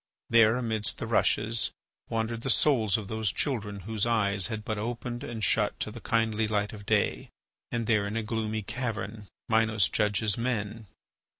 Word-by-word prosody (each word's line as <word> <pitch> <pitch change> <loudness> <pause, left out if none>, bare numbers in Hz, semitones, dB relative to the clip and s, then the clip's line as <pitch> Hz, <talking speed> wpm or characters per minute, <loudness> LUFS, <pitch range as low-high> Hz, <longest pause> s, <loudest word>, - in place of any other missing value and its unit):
There, 115 0 +6
amidst 110 -4 0
the - - -4
rushes, 115 +1 +2 0.4
wandered 115 0 -2
the 135 - -3
souls 115 -7 +3
of 105 -3 -6
those 110 -2 0
children 105 - -2
whose 110 +3 -1
eyes 100 -4 +2
had 110 -2 -5
but 110 -1 -2
opened 120 +2 -4
and 115 -2 -5
shut 105 -2 +2
to 110 - -2
the 120 +1 -9
kindly 110 -1 +1
light 105 0 0
of 100 -2 -10
day, - - +1 0.4
and 120 -1 -1
there 105 -3 +2
in 110 +2 -3
a 115 - -1
gloomy 110 -1 -2
cavern 110 -2 -4 0.2
Minos 110 -3 +3
judges 105 0 +1
men. 110 -3 -2
110 Hz, 170 wpm, -28 LUFS, 105-115 Hz, 0.4 s, There